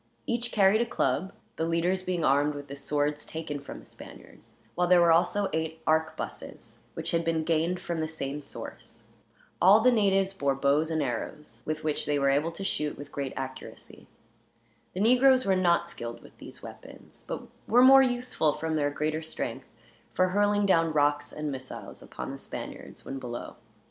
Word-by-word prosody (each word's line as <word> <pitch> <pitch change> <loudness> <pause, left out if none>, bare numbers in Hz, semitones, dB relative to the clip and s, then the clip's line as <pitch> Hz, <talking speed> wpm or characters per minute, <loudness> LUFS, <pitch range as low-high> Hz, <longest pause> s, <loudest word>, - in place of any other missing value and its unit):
Each 240 0 -1
carried 205 +2 +4
a - - +2
club, 155 +9 0 0.3
the - - -1
leaders 170 +3 +1
being 180 -3 -1
armed 145 +2 +3
with 145 -1 -8
the 140 - -6
swords 145 +1 -1
taken 160 -2 -5
from 140 - -9
the - - -16
Spaniards; - - -14 0.2
while 180 0 +1
there 180 0 +6
were 170 -1 +5
also 195 +4 +3
eight 160 0 -2
arquebuses, 160 0 -2 0.2
which - - -3
had 170 0 +1
been 165 -1 0
gained 165 +2 0
from 170 -1 -4
the 160 - -1
same 150 -2 -5
source. - - -9 0.6
All 195 +4 +8
the 250 +3 +5
natives 195 -4 +2
bore 140 -7 0
bows 140 +4 +2
and 160 -2 0
arrows, 140 +4 -5
with 155 0 -3
which 155 -1 -1
they 145 -1 +1
were 140 -1 +3
able 150 +4 +1
to 195 - -6
shoot 150 -6 -1
with 145 0 -10
great 140 -2 -4
accuracy. 130 0 -8 0.9
The 185 - -1
negroes 255 +3 +5
were 195 -1 +3
not 175 -2 +3
skilled 120 -8 -7
with - - -16
these - - -10
weapons; - - -12
but - - -4 0.2
were 245 +3 +6
more 270 +1 +9
useful, 245 - +1
from 160 +1 -2
their 145 -1 +1
greater 155 +2 -2
strength, 160 0 -5 0.5
for 185 0 +3
hurling 205 +1 +2
down 165 -4 +3
rocks 145 0 +1
and 150 -1 -4
missiles 130 -1 -8
upon - - -7
the - - -8
Spaniards, - - -8
when 135 - -5
below. 120 -2 -6
160 Hz, 185 wpm, -28 LUFS, 145-190 Hz, 0.9 s, more